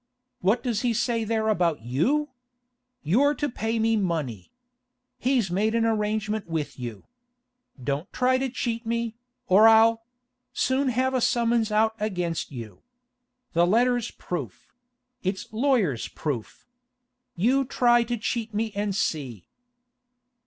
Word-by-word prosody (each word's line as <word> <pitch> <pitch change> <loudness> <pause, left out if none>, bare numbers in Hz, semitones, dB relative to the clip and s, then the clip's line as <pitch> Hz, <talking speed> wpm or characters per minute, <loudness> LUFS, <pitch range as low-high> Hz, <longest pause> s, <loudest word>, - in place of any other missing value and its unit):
What 210 +6 +1
does 235 -4 -1
he 245 -2 +1
say 230 0 0
there 220 0 0
about 170 - +1
you? 250 - +1 0.7
You're 265 - +3
to 290 - -1
pay 225 -3 -2
me 225 0 +2
money. 155 - -2 0.7
He's 245 -7 +1
made 215 +5 +1
arrangements 215 -2 0
with 160 -5 -4
you. 120 -5 -6 0.8
Don't 145 - -3
try 255 0 +2
to 265 0 -1
cheat 235 -2 -3
me, 230 0 -2 0.3
or 205 +4 +6
I'll—soon 245 +4 +1
have 260 +2 0
a 255 - +1
summons 235 -2 +2
out 220 +1 +3
against 180 -7 -2
you. 115 -6 -9 0.7
The 170 +1 +4
letter's 240 +3 +2
proof; 140 - -7 0.5
it's 190 +3 -4
lawyer's 220 - +1
proof. 135 -8 -5 0.7
You 250 +10 +2
try 240 -2 +3
to 240 +1 -2
cheat 225 0 -3
me 220 +1 -1
and 205 -1 -2
see. 130 - -3
220 Hz, 125 wpm, -26 LUFS, 175-240 Hz, 0.8 s, or